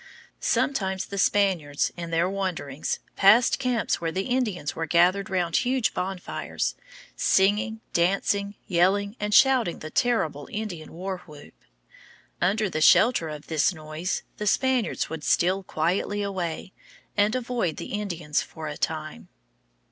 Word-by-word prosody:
Sometimes 190 -8 0
the 200 - -5
Spaniards, 180 -8 +1
in 170 -1 -6
their 165 +1 +1
wanderings, 180 -7 -3 0.2
passed 225 +8 +5
camps 250 -8 0
where 165 -1 -1
the 190 +3 -2
Indians 225 - -1
were 165 0 -3
gathered 180 +4 +3
round 175 -4 +1
huge 250 -1 +1
bonfires, 185 0 -3 0.4
singing, 210 +3 +2
dancing, 200 +3 +1
yelling, 195 +4 +2
and 210 0 -2
shouting 255 -6 +4
the 155 - -8
terrible 160 - 0
Indian 200 -8 -5
war 185 +2 -4
whoop. 150 -2 -13 0.9
Under 195 -3 +1
shelter 215 -1 +5
of 150 -1 -8
this 160 +3 +1
noise 155 +3 -4
the 210 - -3
Spaniards 255 +2 +1
would 160 -2 -5
steal 185 +5 +2
quietly 185 +4 -1
away 185 -2 -4 0.4
and 210 +3 +2
avoid 240 -9 -1
the - - -6
Indians 175 -8 -1
for 160 -1 -8
a 150 - -5
time. 155 -1 -4
190 Hz, 135 wpm, -26 LUFS, 165-210 Hz, 0.9 s, passed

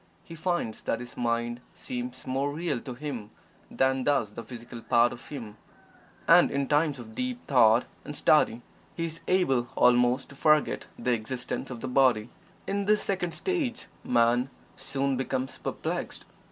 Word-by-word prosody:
He 165 - -11
finds 165 -9 -2
that 115 - -1
his 125 0 -9
mind 120 0 -1
seems 125 +1 -6
more 135 +2 -1
real 160 -3 -2
to 125 0 -7
him 125 -6 -5 0.4
than 130 0 +1
does 135 -8 +1
the 115 - -7
physical 120 0 -9
part 120 +1 +3
of 120 - -12
him, 115 -8 -8 0.7
and - - +7
in 140 0 -1
times 150 -1 +2
of 115 -3 -10
deep 250 - -4
thought 120 -3 +5 0.2
and 145 - -7
study 120 -6 +3 0.3
he 165 - -2
is 165 0 -5
able 135 -10 +2
almost 125 +1 +4
to 140 - -12
forget 155 +1 +2
the 125 - 0
existence 120 +2 -4
of 120 -3 -7
the - - -3
body. 125 -4 +3 0.4
In 200 0 -1
this 210 +1 +3
second 180 -4 -2
stage, 305 -11 -2 0.2
Man 120 +2 +3 0.3
soon 135 -1 -1
becomes 130 0 -3
perplexed. - - -4
130 Hz, 160 wpm, -28 LUFS, 120-150 Hz, 0.7 s, and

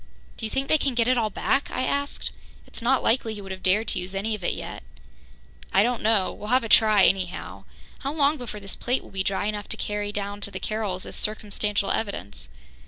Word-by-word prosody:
"Do 225 - -3
you - - -8
think 270 +4 -1
they 310 - +4
can 270 -3 0
get 235 -1 +3
it 255 - +4
all 220 -2 +1
back?" 275 +7 0
I - - -1
asked. 280 +2 -1 0.3
"It's - - -7
not 255 +3 +3
likely 225 -2 +2
he 205 - -7
would 195 -1 -8
have 190 0 -6
dared 205 +5 +2
to 185 - 0
use 185 +2 -6
any 210 +3 0
of 210 -4 -5
it - - +1
yet." - - -6 0.9
"I 195 - +5
don't 240 0 0
know. 210 -3 +2
We'll 210 - -8
have 255 +2 +3
a 225 - -4
try, 215 -3 +6
anyhow. 185 -2 -1 0.3
How 275 - -2
long 295 0 +3
before 235 -5 -6
this 195 -1 -5
plate 250 +2 0
will - - -14
be 195 - -1
dry 195 +1 0
enough 210 -1 -3
to - - 0
carry 210 0 -2
down 205 0 -4
to 205 - -1
the - - -6
Carrolls 210 -4 -2
as - - -8
circumstantial 210 -1 0
evidence?" 200 - -3
215 Hz, 235 wpm, -26 LUFS, 200-240 Hz, 0.9 s, try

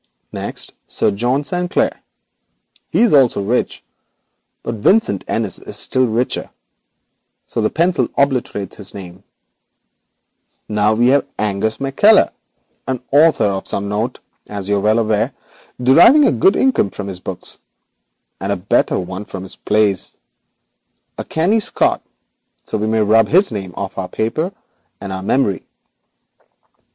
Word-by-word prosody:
Next, - - -5
Sir - - +1
John 120 +7 0
Sanclere; 180 +3 -1 0.9
he - - +2
also 130 -6 +4
is - - -4
rich, 125 +3 -1 0.8
but 115 - -3
Vincent 185 - +3
Innis 110 -5 -1
is - - -6
still 130 -1 +1
richer, 120 +3 -1 1.0
so - - -3
the 110 - +2
pencil 175 +2 +1
obliterates 130 -7 -1
both 100 -2 -4
names. 95 -1 -10 1.5
Now 105 0 +2
we 120 +3 +3
arrive 140 - +2
at 105 - 0
Angus 105 +2 -1
McKeller, 165 +11 +4 0.6
an 130 -2 -3
author 155 +3 +4
of 95 -1 -2
some 100 0 -3
note, 105 +4 -2 0.3
as 100 -2 -5
you 100 0 +1
are - - +1
well 105 +2 +2
aware, 110 -2 0 0.5
deriving 170 - +6
a - - +4
good 140 - +3
income 260 - +2
from 100 0 -7
his 95 -2 -6
books 90 -1 -8 0.8
and 95 +2 -3
a - - +1
better 90 +2 +1
one 95 +2 -5
from 95 -2 -7
his 95 - -11
plays; 105 -3 0 1.0
a - - -2
canny 185 +8 +1
Scot, 210 - +1 0.6
so - - -5
we 105 - -1
may 110 0 +1
rub 110 +2 +4
his 185 +3 +3
name 95 -4 -5
from 95 +1 -5
our 90 -1 -4
paper 135 - -2 0.5
and 100 -1 -6
our 95 - -4
memory. 100 -3 0
110 Hz, 145 wpm, -18 LUFS, 100-135 Hz, 1.5 s, deriving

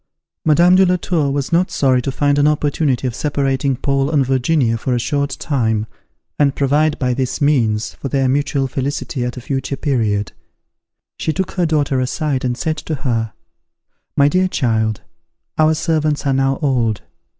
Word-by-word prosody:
Madame 170 +3 +5
de 190 - +6
la 180 -1 +3
Tour 170 -5 0
was 140 +1 -2
not 175 +2 +2
sorry 130 -2 +2
to 135 - -3
find 145 +1 +1
an 145 - +4
opportunity 145 -3 0
of 125 - -1
separating 135 -1 0
Paul 140 +1 0
and 145 -4 +2
Virginia 130 -1 +1
for 125 +2 -1
a - - 0
short 140 +2 -1
time, 110 -7 0 0.5
and 140 -2 +3
provide 145 +2 +1
by 125 -2 0
this 130 0 -2
means, 115 -7 +1
for 135 - -6
their 135 0 +1
mutual 140 0 0
felicity 135 -1 -3
at 125 +1 -4
a - - -6
future 135 +1 -3
period. 110 -8 0 0.9
She - - 0
took 190 +3 -2
her 180 -3 0
daughter 145 -4 +1
aside, 135 +1 -1
and 125 -1 -1
said 160 -1 -2
to 155 +1 -4
her, 115 -5 -2 0.8
"My 140 - +5
dear 185 +5 +2
child, 110 - 0 0.6
our 155 0 +4
servants 155 -3 0
are 135 - +2
now 135 0 +1
old. 120 -7 0
140 Hz, 170 wpm, -18 LUFS, 125-150 Hz, 0.9 s, de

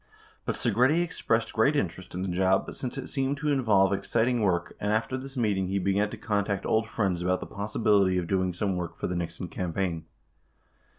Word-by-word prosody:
But - - -1
Segretti 145 +8 +3
expressed 115 -9 -1
great 140 +7 +3
in 140 - +2
terest 90 +2 -12
in 90 - -2
the - - -2
job, 95 +1 +1
since 130 +1 -5
it 135 - -4
seemed 135 0 -1
to 150 +1 0
involve 105 -8 +3
exciting 115 +4 +1
work, 90 -4 0
and 105 - -1
after 110 +4 0
this 135 +1 -7
meeting, 100 -5 +1
he 95 +1 -1
began 100 +2 +1
to - - -7
contact 100 -2 -1
old 110 0 +1
friends 95 -7 0
about 90 +1 +1
the - - -6
possibility 100 -2 +1
of 90 - 0
doing 95 0 +1
some 95 +2 -1
work 85 -2 -4
for - - -3
the 90 - -2
Nixon 85 -1 -4
campaign. 85 -2 -2
100 Hz, 200 wpm, -28 LUFS, 95-115 Hz, -, Segretti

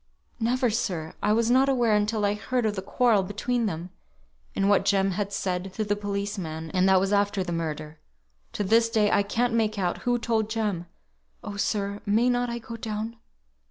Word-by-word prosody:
"Never, 245 +1 +1
sir. 180 -8 -2
I 210 - +2
was 230 +2 +2
not 265 +2 +4
aware 240 -5 +3
until 210 0 +1
I 200 - +2
heard 230 +4 -1
of 210 -1 0
the 190 - -3
quarrel 225 +1 +2
between 225 +5 -1
them, 175 0 -5 0.6
and 195 - +1
what 200 -1 +4
Jem 195 -1 +2
had 200 +2 -2
said 185 -1 -2
to 220 - -1
the 205 0 0
policeman, 200 -6 -4
and 185 0 +3
that 190 -1 +6
was 195 +2 0
after 200 -1 +2
the 175 - -5
murder. 155 -2 -4 0.5
To 205 - -1
this 230 +3 +3
day 215 -3 +2
I - - +4
can't 230 +4 0
make 220 -2 +1
out 180 -3 -1
who 245 -1 +1
told 225 -2 0
Jem. 210 -6 -2 0.6
Oh, 210 -2 -6
sir, 200 0 -1
may 230 +5 +3
not 245 0 0
I 235 - -3
go 230 0 -8
down?" 225 +1 -4
205 Hz, 195 wpm, -26 LUFS, 195-230 Hz, 0.6 s, that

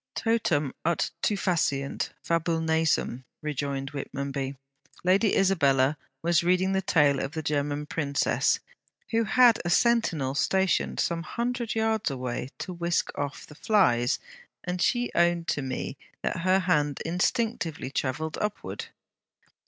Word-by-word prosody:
'Totum 170 - +1
ut 170 0 0
to 210 - +2
faciant, 160 -8 0
Fabulle, 165 0 0
nasum,' 160 -6 +1 0.2
rejoined 140 -2 -3
Whitmonby. 140 -1 -4 0.5
'Lady 195 +4 +3
Isabella 145 -8 +3 0.3
was 170 0 +3
reading 185 +2 +2
the 190 - +1
tale 145 -7 +3
of 135 - -3
the 160 - -4
German 145 0 -1
princess, 140 -2 +1 0.5
who 225 0 +2
had 240 +1 +5
a 175 - -2
sentinel 175 - +2
stationed 190 +5 +1
some 170 -1 0
hundred 235 +4 -3
yards 220 -2 +1
away 125 -1 -4
to 185 - -5
whisk 170 0 0
off 145 -1 -4
the - - -14
flies, 125 - +2 0.5
and 180 0 -3
she 245 -1 +1
owned 170 -1 +2
to 145 - 0
me 130 -1 -4 0.3
that - - -1
her 185 +2 +3
hand 150 -6 +1
instinctively 175 - -1
travelled 150 +4 -2
upward.' 210 0 -4
165 Hz, 130 wpm, -27 LUFS, 140-190 Hz, 0.5 s, had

